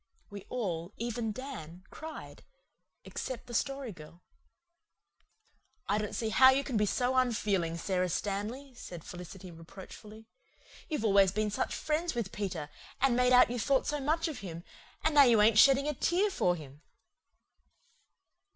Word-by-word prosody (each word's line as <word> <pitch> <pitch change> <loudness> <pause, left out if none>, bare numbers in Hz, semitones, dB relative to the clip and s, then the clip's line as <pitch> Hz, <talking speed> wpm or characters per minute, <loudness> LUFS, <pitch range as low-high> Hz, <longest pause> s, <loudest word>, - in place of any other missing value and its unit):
We 200 -1 -9
all, 185 -6 -3
even 235 -1 -3
Dan, 205 - -8
cried, 315 0 -9 0.6
except 255 - -6
the 240 - -10
Story 275 0 -2
Girl. 170 0 -14 1.6
"I 205 +1 +1
don't 210 -1 -4
see 225 - -1
how 260 +4 +7
you 270 +1 +3
can 265 - -4
be 210 -1 +2
so 250 +5 0
unfeeling, 205 -9 +1
Sara 185 0 -1
Stanley," 215 +10 -3
said 175 -9 -9
Felicity 180 +1 -9
reproachfully. 195 +6 -12 0.6
"You've 300 -9 -2
always 195 -3 +5
been 215 +1 -1
such - - -2
friends 315 0 -1
with 230 -5 -3
Peter 180 -8 -4 0.3
and 265 -2 +3
made 250 0 +3
out 250 -1 +6
you 245 - -2
thought 265 +4 +2
so 295 0 -1
much 315 +5 0
of 310 -5 -5
him 170 -3 -8 0.4
and 315 - +2
now 290 -1 +8
you 235 -3 +5
ain't 215 +1 +5
shedding 275 +2 +6
a 300 - 0
tear 365 +9 +1
for 175 - +1
him." 145 -3 -12
220 Hz, 155 wpm, -31 LUFS, 185-265 Hz, 1.6 s, now